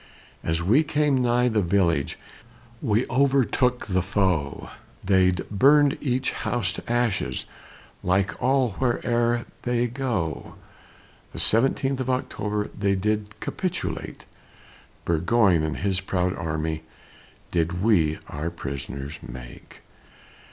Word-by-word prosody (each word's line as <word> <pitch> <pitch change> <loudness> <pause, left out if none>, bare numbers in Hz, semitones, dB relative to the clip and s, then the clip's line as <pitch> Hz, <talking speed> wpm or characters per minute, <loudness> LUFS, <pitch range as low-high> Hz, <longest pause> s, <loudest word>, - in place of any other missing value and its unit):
As 80 +1 -1
we 120 - +4
came 150 -3 +1
nigh 125 0 +3
the 110 -3 +2
village, 85 -6 +1 0.6
We 115 -2 +1
overtook 130 -1 +2
the 95 -2 +1
foe; 90 -7 -1 0.3
They'd 95 -2 +2
burned 140 +7 +5
each 130 -1 0
house 110 -5 -1
to - - -6
ashes, 120 -5 0 0.6
Like 95 +2 0
all 130 -2 +2
where'er 120 -1 +1 0.2
they 120 0 +1
go. 120 - -3 0.8
The - - -6
seventeenth 135 +3 +2
of 130 0 -2
October, 105 -5 -2
They 100 -1 +1
did 105 +2 -2
capitulate, 185 -3 -4 0.8
Burgoyne 85 +2 +3
and 75 -4 -2
his 95 -1 0
proud 90 -1 -1
army 80 -1 -2 0.7
Did 85 +2 0
we 85 -9 +3
our 75 +3 -4
prisoners 70 -2 -6
make. - - -11
105 Hz, 110 wpm, -25 LUFS, 85-125 Hz, 0.8 s, burned